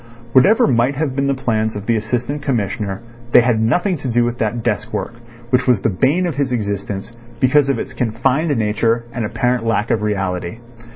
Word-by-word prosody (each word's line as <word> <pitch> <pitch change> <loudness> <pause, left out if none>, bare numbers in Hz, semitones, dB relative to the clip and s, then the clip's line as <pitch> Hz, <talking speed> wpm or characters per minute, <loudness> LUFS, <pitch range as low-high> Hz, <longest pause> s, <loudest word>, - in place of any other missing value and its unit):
Whatever 195 - +5
might 125 +1 +2
have 140 -2 -2
been 140 0 0
the 140 - +1
plans 110 -4 -1
of 105 0 -6
the 115 - +2
Assistant 125 +6 -2
Commissioner 105 -6 -2 0.3
they - - +8
had 120 -2 +1
nothing 175 - +1
to 135 - -5
do 120 0 +2
with 120 0 -3
that 110 +1 -1
desk - - -1
work, - - -3 0.4
which 125 0 +2
was 120 -6 +3
the - - +1
bane 135 - +1
of 165 -6 -3
his 140 -3 0
existence 100 -1 -3 0.2
because 135 +3 +3
of 135 - +1
its 130 - -5
confined 130 +6 0
nature 115 +2 0
and 120 - -3
apparent 125 +2 0
lack 115 -1 0
of 110 - +1
reality. 95 -3 -2
120 Hz, 195 wpm, -18 LUFS, 110-135 Hz, 0.4 s, they